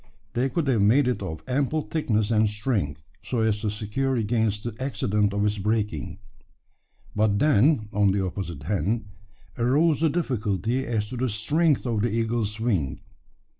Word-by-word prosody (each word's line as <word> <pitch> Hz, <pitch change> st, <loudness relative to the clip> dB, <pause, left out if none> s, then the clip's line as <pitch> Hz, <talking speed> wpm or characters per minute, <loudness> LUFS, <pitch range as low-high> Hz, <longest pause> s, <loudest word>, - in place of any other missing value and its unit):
They 125 Hz, +3 st, +1 dB
could 160 Hz, +4 st, -1 dB
have 125 Hz, -6 st, +2 dB
made 125 Hz, +7 st, +4 dB
it 125 Hz, -, -1 dB
of 80 Hz, -5 st, -5 dB
ample 145 Hz, +4 st, 0 dB
thickness 110 Hz, -10 st, 0 dB
and 110 Hz, -1 st, +3 dB
strength, 105 Hz, -, -2 dB, 0.2 s
so 120 Hz, -3 st, -2 dB
as 110 Hz, -2 st, +1 dB
to 110 Hz, -, -1 dB
secure 110 Hz, +6 st, -1 dB
against 110 Hz, -2 st, 0 dB
the 120 Hz, -2 st, -4 dB
accident 105 Hz, -6 st, 0 dB
of 100 Hz, +1 st, 0 dB
its 105 Hz, 0 st, 0 dB
breaking. 105 Hz, -3 st, -1 dB, 1.0 s
But 105 Hz, -1 st, +2 dB
then, 140 Hz, -2 st, +3 dB
on 105 Hz, -1 st, +3 dB
the 95 Hz, 0 st, 0 dB
opposite 85 Hz, -5 st, -5 dB
hand, 105 Hz, +4 st, -1 dB, 0.5 s
arose 145 Hz, +6 st, +3 dB
the 160 Hz, -, +4 dB
difficulty 120 Hz, -, -1 dB
as 110 Hz, -3 st, -1 dB
to 125 Hz, -, -5 dB
the 130 Hz, +1 st, 0 dB
strength 145 Hz, +9 st, +1 dB
of 115 Hz, -4 st, 0 dB
the 120 Hz, -, +1 dB
eagle's 115 Hz, -1 st, -1 dB
wing. 95 Hz, -, -1 dB
110 Hz, 165 wpm, -25 LUFS, 105-130 Hz, 1.0 s, made